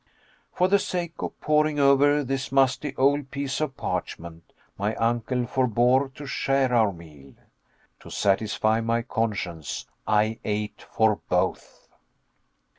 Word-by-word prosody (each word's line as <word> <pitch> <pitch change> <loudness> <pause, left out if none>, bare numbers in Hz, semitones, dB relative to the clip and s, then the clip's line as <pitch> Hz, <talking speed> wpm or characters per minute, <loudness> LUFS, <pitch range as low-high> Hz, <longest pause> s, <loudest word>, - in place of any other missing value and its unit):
For 180 - +2
the 200 +1 +4
sake 175 -4 -3
of - - -5
poring 150 0 +2
over 145 +1 +4
this 135 0 -3
musty 135 +1 +2
old 140 +1 +2
piece 140 +1 -3
of 145 -3 -2
parchment, 85 0 -5 0.2
my 105 +2 -2
uncle 120 +2 0
forbore 125 +2 +2
to 145 - -8
share 135 -2 0
our 110 -4 +4
meal. 75 -6 -14 0.6
To - - -13
satisfy 110 +2 +1
my 115 +1 0
conscience, 95 - -3 0.2
I 110 +1 +2
ate 105 0 -3
for 110 -2 +2
both. - - -2
125 Hz, 125 wpm, -25 LUFS, 105-140 Hz, 0.6 s, the